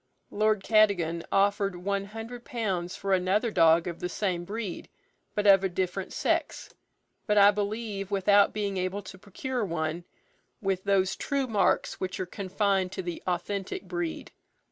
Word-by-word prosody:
Lord 215 -1 +1
Cadogan 195 -7 +3
offered 200 -1 +2
one 200 +2 -2
hundred 225 +3 -8
pounds 190 -8 -3
for 195 -1 -1
another 190 +5 +2
dog 165 -2 +5
of 170 -2 -5
the 180 - -3
same 180 -3 -2
breed, 205 -1 -5 0.5
but 210 - 0
of 195 -1 +7
a 190 - +1
different 185 +1 -3
sex; - - -1 0.6
but 210 -1 +2
I 200 0 +8
believe 205 -1 -3
without 200 0 +4
being 200 -2 -2
able 185 +2 -2
to 190 - -11
procure 240 +5 -4
one 165 -2 -2 0.6
with 195 -4 -2
those 190 0 +2
true 280 -1 -1
marks 220 -5 +1
which 185 0 -4
are 185 - -1
confined 190 0 -1
to 190 - -4
the 175 -1 -5
authentic 190 +3 -2
breed. 175 -3 -4
195 Hz, 155 wpm, -28 LUFS, 180-210 Hz, 0.6 s, I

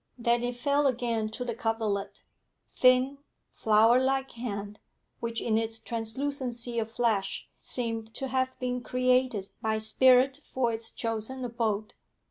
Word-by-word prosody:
Then 235 0 +2
it 245 0 -2
fell 280 +3 +2
again 235 -4 -1
to 245 +3 -5
the 235 - -2
coverlet 215 -3 -2 0.5
thin, 255 +2 +4 0.3
flower 220 +3 +4
like 270 0 0
hand, 210 -3 -5 0.4
which 230 0 -2
in 220 -1 +1
its 225 0 -2
translucency 240 +1 -2
of 220 0 -2
flesh 220 -4 0
seemed 225 -2 -1
to 270 - -2
have 260 0 -1
been 250 0 -2
created 250 -5 +1
by 220 0 0
spirit 255 +4 +4
for 240 -3 -1
its 225 0 -4
chosen 230 +3 -3
abode. 220 -3 -2
235 Hz, 135 wpm, -28 LUFS, 220-255 Hz, 0.5 s, thin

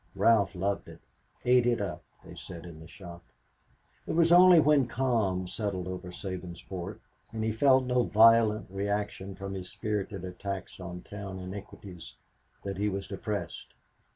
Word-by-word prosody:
Ralph 105 -4 +3
loved 100 +2 -2
it, - - -12 0.5
"ate 125 -1 +5
it 120 -1 +2
up," 95 -6 -4 0.2
they - - -11
said 85 -1 -9
in 85 -3 -10
the 80 - -12
shop. 85 -2 -11 0.9
It - - -2
was 165 0 +4
only 180 0 +8
when 150 -4 +4
calm 115 -8 0
settled 95 -1 -3
over 90 0 -6
Sabinsport 95 +1 -6 0.3
and 110 -1 -3
he 110 - +1
felt 130 +3 +4
no 125 0 +2
violent 110 -1 +5
reaction 100 -1 -3
from 95 +1 -6
his 95 -2 -6
spirited 105 -3 -3
attacks 95 +2 -6
on 90 0 -7
town 100 -2 -7
iniquities 95 -6 -9 0.5
that 100 -1 -4
he 105 +1 +1
was 95 -1 -4
depressed. 100 +1 -5
100 Hz, 155 wpm, -29 LUFS, 95-115 Hz, 0.9 s, only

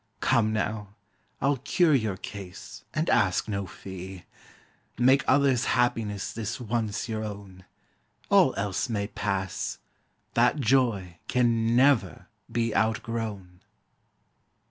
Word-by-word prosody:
Come, 110 -2 +2
now, 105 -2 -3 0.5
I'll 140 +1 +2
cure 155 +5 +2
your 110 -8 +1
case, 100 +3 -9
and 155 +2 -1
ask 95 -1 +2
no 100 -2 -3
fee: 95 0 -9 0.7
Make 130 +3 +4
others' 135 -2 +3
happiness 105 -4 0
this 115 +2 -4
once 115 -2 -2
your 110 -1 -3
own; 100 -3 -8 0.6
All - - +5
else 100 +4 -2
may 100 -3 -1
pass: 95 -3 -3 0.6
that 125 +5 +3
joy 110 -9 +1
can 115 -2 +2
never 125 - +3 0.3
be 115 -1 0
Outgrown! 110 -5 -2
110 Hz, 110 wpm, -27 LUFS, 100-120 Hz, 0.7 s, All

